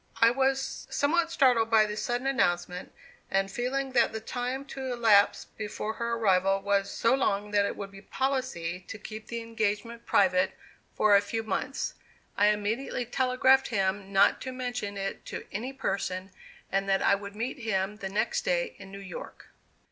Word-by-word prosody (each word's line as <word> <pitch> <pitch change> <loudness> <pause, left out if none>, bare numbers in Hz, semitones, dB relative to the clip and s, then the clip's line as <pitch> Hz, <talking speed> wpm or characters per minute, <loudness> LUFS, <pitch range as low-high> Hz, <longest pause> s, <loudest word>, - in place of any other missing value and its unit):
I 230 0 +6
was 270 +1 0
somewhat 320 +5 +2
startled 245 -7 +4
by 220 -1 +5
this 210 0 -4
sudden 245 +2 -2
announcement; 180 -9 0 0.4
and 195 0 +1
feeling 265 +4 -2
that 240 -2 +3
the 220 - -4
time 250 +4 -3
to 265 -1 -4
elapse 220 -4 +4
before 215 0 -5
her 235 +1 -2
arrival 195 -3 +3
was 200 0 +1
so 230 - +2
long 210 -6 0
that 205 -1 +3
it - - -4
would 200 -1 -6
be 195 0 -12
policy 255 -10 -2
to 220 - -6
keep 215 +1 -9
the 235 -1 -4
engagement 230 0 -3
private 185 -1 +3 0.4
for 210 -1 +5
a 200 - +6
few 225 +2 -3
months, 225 +6 -2 0.4
I 205 - +4
immediately 210 +4 0
telegraphed 260 +2 +3
him 195 -2 -1
not 195 +1 +4
to 260 - -4
mention 245 -5 -4
it 195 0 -4
to - - -6
any 235 +7 -3
person, 195 -6 -3 0.4
and 195 0 0
that 195 0 +2
I - - +5
would 200 0 -4
meet 240 +5 -3
him 210 -3 -1
the 195 -2 -5
next 205 +2 0
day - - 0
in 195 -1 -11
New 195 - -8
York. 190 -3 -9
220 Hz, 175 wpm, -28 LUFS, 195-250 Hz, 0.4 s, I